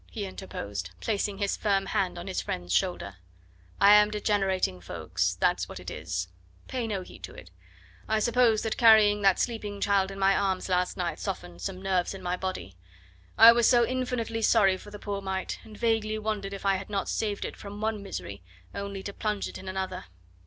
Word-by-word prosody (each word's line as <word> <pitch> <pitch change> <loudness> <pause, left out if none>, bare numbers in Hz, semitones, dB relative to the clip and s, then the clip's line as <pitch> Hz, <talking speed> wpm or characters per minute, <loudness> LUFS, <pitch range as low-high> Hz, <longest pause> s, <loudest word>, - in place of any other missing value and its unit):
he 210 -4 -5
interposed, 100 - -6
placing 200 - -1
his 200 -1 0
firm 195 -2 +1
hand 180 -2 -1
on 175 - -6
his 190 - -2
friend's 90 0 -4
shoulder. 140 - -1 0.6
"I 200 +1 +8
am 210 0 +6
degenerating, 195 - 0
Ffoulkes 85 - -2
that's - - +1
what - - -7
it - - -7
is. 90 +1 -3 0.4
Pay 245 -3 -3
no 195 -4 -3
heed - - -14
to 90 +2 -9
it. 90 - -12 0.6
I 220 - +1
suppose 230 0 +3
that 225 - -2
carrying 215 -3 +6
that 195 -2 +4
sleeping 210 -4 -3
child 200 -1 +2
in 195 - -8
my 195 0 +3
arms 190 -2 0
last 180 0 0
night 170 -4 -2
softened 90 - -5
some 185 - -4
nerves 190 -1 0
in 190 - -10
my 180 0 -1
body. 180 - -5 0.6
I 225 +1 +11
was 235 -1 +4
so 240 -2 +5
infinitely 250 -3 -2
sorry 200 -4 +4
for 195 - -11
the 205 - -9
poor 200 -1 -4
mite, 190 -1 -3
and 215 -1 -13
vaguely 225 -2 0
wondered 210 -2 -3
if 195 - -9
I 195 -1 +3
had 190 +2 -8
not 200 -1 -2
saved 210 -2 -2
it - - -6
from 205 0 -9
one 215 -1 -1
misery 100 - -6 0.3
only 200 -1 -5
to 200 - -6
plunge 210 -2 -2
it - - -8
in 190 - -7
another. 190 - -4
200 Hz, 200 wpm, -28 LUFS, 185-215 Hz, 0.6 s, I